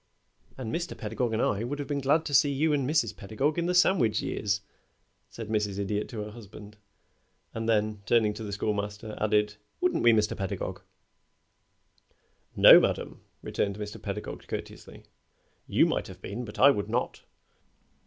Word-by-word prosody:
"And 115 -4 -5
Mr. 170 +1 -3
Pedagog 110 +2 -2
and 110 +1 0
I 105 +2 0
would 135 +5 -3
have 145 - -5
been 145 -1 -2
glad 150 +4 +2
to 145 - -4
see 140 +1 +5
you 150 +3 +1
and 140 -2 0
Mrs. 120 -9 +1
Pedagog 135 - -1
in 170 - -1
the 180 - 0
sandwich 175 - +3
years," 105 0 -1 0.7
said 115 -2 -8
Mrs. 105 -2 -1
Idiot 105 +1 -2
to 110 -3 -5
her 105 - -8
husband; 105 -1 -12 0.8
and 115 0 -3
then, 105 -1 +1
turning 110 -2 +3
to 105 - -9
the 105 - -5
Schoolmaster, 105 +1 -3
added, 105 -1 +1 0.2
"Wouldn't 360 0 +1
we, 120 - +6
Mr. 105 -2 +2
Pedagog?" 95 -2 -4 1.7
"No, - - +10
madame," - - -2 0.2
returned 100 0 -2
Mr. 105 0 -7
Pedagog, 105 +1 -6
courteously. - - -8 0.6
"You - - +4
might - - -1
have - - -11
been, 125 - -6
but 105 - -10
I 140 +2 +7
would 100 -6 -3
not. - - -2
110 Hz, 165 wpm, -28 LUFS, 105-135 Hz, 1.7 s, No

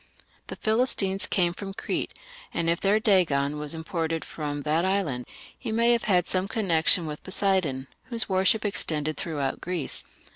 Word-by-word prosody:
The - - -5
Philistines 215 -4 +1
came 175 -3 +2
from 195 +1 -7
Crete, 225 - -2 0.3
and 170 - -1
if 170 - -1
their 205 +2 +3
Dagon 150 - +2
was 150 +1 -2
imported 160 0 -2
from 145 -2 -4
that 155 +4 +1
island, 185 -11 0 0.3
he 235 - -5
may 230 +2 +3
have 235 -1 +2
had 180 -4 +3
some 185 +1 -1
connection 175 -5 +2
with 150 -1 -5
Poseidon, 185 -9 0 0.2
whose 235 -3 -2
worship 190 +3 +2
extended 155 -6 +1
throughout 145 -5 -2
Greece. 175 -5 -2
180 Hz, 155 wpm, -26 LUFS, 155-200 Hz, 0.3 s, their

